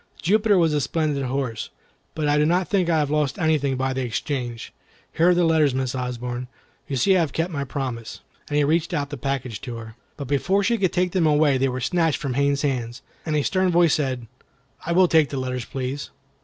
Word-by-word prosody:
Jupiter 205 Hz, +4 st, +3 dB
was 165 Hz, -3 st, +3 dB
a 150 Hz, -, +1 dB
splendid 150 Hz, -2 st, -1 dB
horse, 125 Hz, -4 st, -3 dB, 0.5 s
but 155 Hz, -2 st, -1 dB
I 145 Hz, 0 st, +3 dB
do -, -, +4 dB
not 175 Hz, +4 st, +2 dB
think 185 Hz, -4 st, +1 dB
I 160 Hz, -2 st, +3 dB
lost 150 Hz, -1 st, 0 dB
anything 150 Hz, -5 st, +1 dB
by 130 Hz, 0 st, -1 dB
the 130 Hz, -, -2 dB
exchange. 120 Hz, 0 st, -4 dB, 0.4 s
Here 170 Hz, +2 st, +4 dB
are 180 Hz, -, +4 dB
the 175 Hz, -, +3 dB
letters, 155 Hz, -5 st, +3 dB
Miss 130 Hz, -1 st, -1 dB
Osborne; 125 Hz, -1 st, -4 dB, 0.4 s
you 140 Hz, -, -3 dB
see 190 Hz, +10 st, +3 dB
I -, -, +4 dB
have 160 Hz, -5 st, 0 dB
kept 165 Hz, +2 st, -1 dB
my 140 Hz, -2 st, -2 dB
promise," 130 Hz, -5 st, -5 dB, 0.3 s
and 145 Hz, -, 0 dB
he 150 Hz, -, +4 dB
reached 160 Hz, +3 st, +1 dB
out 145 Hz, 0 st, -2 dB
the -, -, -3 dB
package 130 Hz, -4 st, -3 dB
to 125 Hz, -4 st, -6 dB
her. 110 Hz, -1 st, -9 dB, 0.2 s
But 140 Hz, -, -6 dB
before 190 Hz, +9 st, +1 dB
she 230 Hz, +3 st, +1 dB
could 185 Hz, -3 st, +2 dB
take 180 Hz, 0 st, 0 dB
them 180 Hz, -3 st, +1 dB
they 145 Hz, -3 st, +3 dB
were 130 Hz, 0 st, -3 dB
snatched 165 Hz, +3 st, +1 dB
from 140 Hz, -3 st, -3 dB
Haines's 140 Hz, +2 st, +1 dB
hand, 125 Hz, -3 st, -2 dB, 0.3 s
and 155 Hz, -, 0 dB
a 150 Hz, -, +2 dB
stern 185 Hz, +2 st, +1 dB
voice 170 Hz, -2 st, +4 dB
said, 130 Hz, -5 st, -1 dB, 0.6 s
"I 170 Hz, -, -3 dB
will 180 Hz, +1 st, +5 dB
take 160 Hz, -3 st, +4 dB
the 140 Hz, -, -4 dB
letters, 125 Hz, -2 st, -3 dB
please." 135 Hz, +1 st, -4 dB
145 Hz, 220 wpm, -23 LUFS, 130-165 Hz, 0.6 s, will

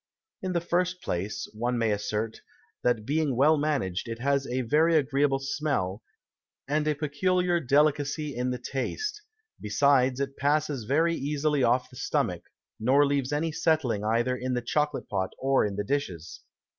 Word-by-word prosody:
In 185 Hz, -1 st, -2 dB
the 170 Hz, -, +1 dB
first 180 Hz, +1 st, 0 dB
place, 95 Hz, +5 st, -3 dB
one 120 Hz, +3 st, -1 dB
may 115 Hz, -2 st, +1 dB
assert, 105 Hz, +2 st, -2 dB, 0.4 s
that 120 Hz, -3 st, +1 dB
being 150 Hz, -1 st, 0 dB
well 145 Hz, +5 st, +5 dB
managed, 140 Hz, -, -1 dB
it 115 Hz, 0 st, -4 dB
has 140 Hz, +2 st, 0 dB
a 130 Hz, +1 st, -1 dB
very 155 Hz, +7 st, +3 dB
agreeable 140 Hz, -1 st, +2 dB
Smell, 135 Hz, -8 st, -2 dB, 0.7 s
and 150 Hz, +2 st, 0 dB
a 150 Hz, -, +2 dB
peculiar 175 Hz, +4 st, +1 dB
Delicacy 145 Hz, 0 st, +1 dB
in 125 Hz, +1 st, -1 dB
the 125 Hz, -, -2 dB
Taste; 420 Hz, -, -3 dB, 0.4 s
besides, 130 Hz, +3 st, +3 dB
it 140 Hz, 0 st, -3 dB
passes 145 Hz, -3 st, 0 dB
very 160 Hz, +7 st, +2 dB
easily 150 Hz, 0 st, 0 dB
off 125 Hz, +1 st, +2 dB
the -, -, -13 dB
Stomach, -, -, -1 dB, 0.4 s
nor 135 Hz, +6 st, +4 dB
leaves 140 Hz, -1 st, 0 dB
any 155 Hz, +2 st, 0 dB
Settling 150 Hz, -10 st, +1 dB
either 120 Hz, +4 st, +1 dB
in 130 Hz, 0 st, -2 dB
the 120 Hz, -, -2 dB
Chocolate 150 Hz, +3 st, -1 dB
Pot, 95 Hz, -2 st, -2 dB
or 135 Hz, 0 st, +2 dB
in 100 Hz, -, -5 dB
the 105 Hz, -, -2 dB
Dishes. 100 Hz, -, -3 dB
140 Hz, 160 wpm, -27 LUFS, 120-150 Hz, 0.7 s, well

